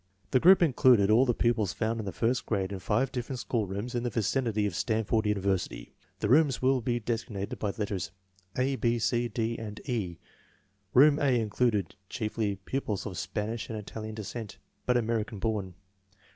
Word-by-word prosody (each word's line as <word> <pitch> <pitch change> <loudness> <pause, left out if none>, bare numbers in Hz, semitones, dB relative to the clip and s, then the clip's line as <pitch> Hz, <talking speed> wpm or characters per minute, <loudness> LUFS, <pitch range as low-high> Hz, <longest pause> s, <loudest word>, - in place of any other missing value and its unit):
The 130 - +5
group 185 +5 +7
included 125 -8 +5
all 125 +5 +5
the 120 - +3
pupils 110 -5 +1
found 115 0 -1
in 105 - -4
the - - -2
first 120 +8 0
grade 100 -3 -1
in 100 - -4
five 120 +7 0
different 125 +1 -4
schoolrooms 110 -1 -2
in 120 - 0
the 120 - -1
vicinity 110 0 0
of 100 - -1
Stanford 110 +1 0
University. 100 -2 -1 0.3
The - - +1
rooms 140 +2 +4
will 130 0 +2
be 120 +1 0
designated 110 -3 -4
by 105 - -1
the 110 +3 -5
letters 100 -4 -2 0.5
A, 130 +1 +1
B, 120 -1 +1
C, 120 +1 +1
D, 115 -1 -2
and 110 -1 -6
E. 100 -10 -2 0.8
Room 145 +3 +7
A 130 -4 +3
included 105 -3 0 0.2
chiefly 105 -2 -2
pupils 105 +1 -3
of 100 -4 -5
Spanish 105 +5 -3
and 110 - -4
Italian 110 +1 -6
descent, 110 0 -6 0.3
but 125 0 +4
American 115 -2 -1
born. 100 -3 -2
110 Hz, 175 wpm, -29 LUFS, 105-125 Hz, 0.8 s, group